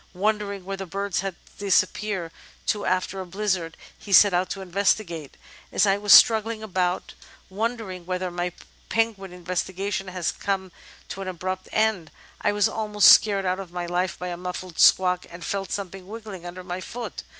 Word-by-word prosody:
Wondering 200 -1 -1
where 195 0 -4
the 195 -1 -6
birds 195 +1 -2
had 190 -1 -3 0.2
disappeared 195 -2 0 0.3
to 205 -1 0
after 185 +1 -1
a - - -6
blizzard, 185 -4 -2 0.2
he 205 - -11
set 200 0 +7
out 180 +1 +1
to 195 - -5
investigate. 180 -4 -1 0.3
"As - - +3
I 195 0 +2
was 205 0 +1
struggling 220 0 +7
about, 185 -3 -1 0.4
wondering 205 -4 -3
whether 185 0 -2
my 175 0 -2 0.4
penguin 225 -4 0
investiga 185 +2 -3
tions 195 -1 -3
had 185 -2 -3
come 190 -2 -2 0.4
to 195 - -6
an 190 - -5
abrupt 185 +1 -4
end, 215 -7 +1 0.3
I 205 - +2
was 205 -1 +3
almost 210 -2 +4
'scared 200 -2 +5
out 185 +1 0
of 190 -3 -8
my 175 0 -4
life' 180 +1 -1
by 180 - -5
a 175 - -4
muffled 180 -1 -6
squawk, 180 -1 +5
and 170 0 -9
felt 195 -1 -3
something 195 -1 -5
wriggling 210 -5 -8
under 180 +1 -8
my 180 0 -5
foot. 240 +5 -6
190 Hz, 175 wpm, -25 LUFS, 180-205 Hz, 0.4 s, set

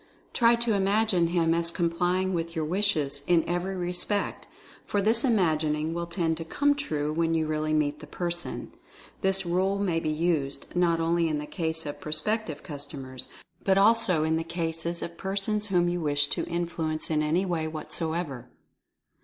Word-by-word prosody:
Try 235 -1 +5
to 235 -1 +1
imagine 200 -2 +2
him 165 -1 +2
as 170 0 +1
complying 175 +2 0
with 165 0 -2
your 160 -1 0
wishes, 155 -6 +1
in 170 -2 +3
every 175 +2 -1
respect, 180 +3 -1 0.4
for 205 - -1
this 225 +4 +3
imagining 160 - +1
will 170 0 -3
tend 170 -2 0
to 165 - -4
'come 285 - +2
true* 155 - -2
when 165 0 +1
you 160 -1 +1
really 155 0 -1
meet 150 -1 +1
the 150 - -10
person. 175 +2 -4 0.5
This 190 -1 +1
rule 185 +3 +1
may 185 -5 +1
be 160 -2 -2
used, 155 -3 -1
not 170 -2 +3
only 165 0 +2
in 155 - 0
the 150 - -4
case 160 0 -2
of 145 - -6
prospective 155 +1 -2
customers, 140 -3 -5 0.3
but 190 -1 +3
also 200 -5 +4
in 160 0 +1
the 165 - -1
cases 165 0 -3
of 170 0 -7
persons 200 +2 -1
whom 175 -3 +2
you 175 0 -1
wish 145 -1 +2
to - - -1
influence 165 -2 -2
in 155 -1 +2
any 160 +5 +1
way 170 -3 -1
w 155 0 -4
hat - - -8
so 160 -2 0
ever." 145 -8 -4
170 Hz, 180 wpm, -27 LUFS, 155-190 Hz, 0.5 s, Try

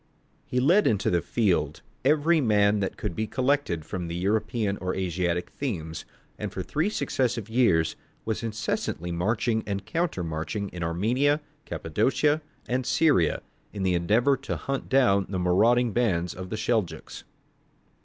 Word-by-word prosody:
He 125 - 0
led 175 +11 +4
into 105 -3 +1
the 85 -1 +2
field 85 -10 0 0.2
every 155 +4 +3
man 105 -3 +3
that 95 -1 -2
could 85 - -4
be 110 0 -1
collected 130 - 0
from 90 0 -4
the 85 - -4
European 100 +2 0
or 90 0 -3
Asiatic 90 -1 -1
themes, 80 - -4 0.3
and - - -4
for 95 - -4
three 155 - 0
successive 120 - -1
years 95 -10 +3 0.3
was 110 -1 -2
incessantly 105 -6 -3
marching 110 +6 0
and 100 -1 -3
counter 165 - -1
marching 80 +6 -3
in 90 - -8
Armenia, 120 - +1 0.3
Cappadocia, 135 - +1 0.3
and 125 +1 0
Syria, 145 - +3 0.3
in 100 -2 -3
the 95 -1 +2
endeavour 110 +11 +3
to 135 - -4
hunt 135 0 -4
down 110 -8 +3
the 95 - -2
marauding 110 +7 +3
bands 95 -7 0
of 95 0 -7
the 110 - -3
Seljouks. 110 -4 -2
105 Hz, 150 wpm, -26 LUFS, 90-125 Hz, 0.3 s, led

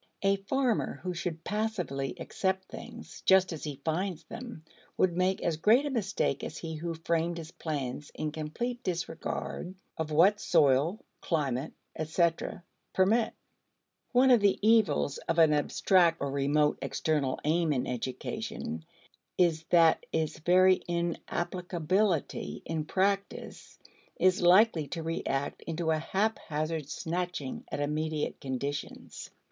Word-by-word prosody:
A 195 0 +3
farmer 235 +4 0
who 180 -1 -2
should 170 -2 -4
passively 180 - -2
accept 190 0 -1
things - - -10
just 190 -1 +5
as 155 - -7
he 145 -3 -5
finds 170 +1 -1
them 230 -4 -9 0.3
would 180 -2 +2
make 185 +1 +1
as 165 -2 0
great 225 - +4
a 290 - -2
mistake 195 - -1
as 155 - -5
he 165 -1 -5
who 165 +2 -4
framed 165 +1 -1
his 160 -1 -7
plans 145 -2 -4
in 155 -1 -2
complete 235 +12 -4
disregard 175 +1 -4 0.2
of 160 -1 -2
what 180 +7 +5
soil, 145 +7 +3 0.2
climate, 140 -3 -1 0.2
etc., 165 +2 0 0.3
permit. 220 +5 +3 0.8
One 255 +1 +5
of 245 - +7
the 200 -2 +3
evils 195 -11 +3
of - - 0
an 160 -2 +6
abstract 165 +3 +3
or 140 -1 -2
remote 145 +2 +2
external 145 -5 -1
aim 160 +1 +2
in 130 -4 0
education 115 -9 -4 0.5
is 165 -3 +2
that 165 -1 +4
its 160 -1 -1
very 185 +3 +5
inapplicability 175 +1 -1
in 160 -2 -2
practice 195 +4 -2 0.4
is 185 0 +3
likely 175 -3 +5
to 165 +3 -5
react 145 -4 -2
into 165 0 -2
a 155 - +1
haphazard 160 -6 -2
snatching 175 -4 -3
at - - -3
immediate 150 +1 -2
conditions. 140 +2 -5
165 Hz, 130 wpm, -30 LUFS, 150-190 Hz, 0.8 s, of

